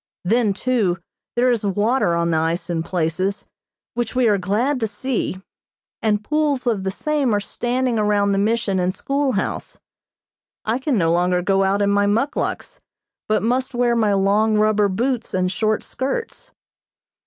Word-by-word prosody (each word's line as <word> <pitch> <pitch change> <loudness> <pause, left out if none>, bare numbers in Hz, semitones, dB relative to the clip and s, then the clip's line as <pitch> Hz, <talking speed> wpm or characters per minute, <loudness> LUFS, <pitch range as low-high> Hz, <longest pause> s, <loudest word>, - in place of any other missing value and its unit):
Then, 220 +1 +2
too, 210 -5 0 0.4
there 245 +1 +3
is 235 -3 0
water 205 -1 +1
on 170 0 0
the 160 - +2
ice 165 +3 -1
in 165 -1 -1
places, 175 +3 -2 0.5
which 240 0 -3
we 250 -2 +3
are 205 -2 +3
glad 225 +9 0
to 225 - 0
see, 215 -3 -3 0.6
and 210 -2 +1
pools 300 -1 0
of 220 -5 0
the 190 - -1
same 275 +2 0
are - - +2
standing 245 +3 -1
around 205 -1 +2
the 195 - +1
Mission 210 -2 +1
and 180 +1 0
schoolhouse. 275 +4 -2 0.9
I 225 +3 0
can 265 -2 0
no 165 -3 +2
longer 180 +1 +1
go 195 +1 +2
out 195 +1 +1
in 200 - +2
my 200 0 +2
muckluks, 230 +8 -1 0.5
but 215 -1 +1
must 255 +3 0
wear 240 -1 +2
my 215 -3 +2
long 205 +3 +2
rubber 210 -1 +3
boots 240 +5 -1
and 185 0 +1
short 215 +3 0
skirts. 470 - -4
210 Hz, 165 wpm, -21 LUFS, 195-245 Hz, 0.9 s, there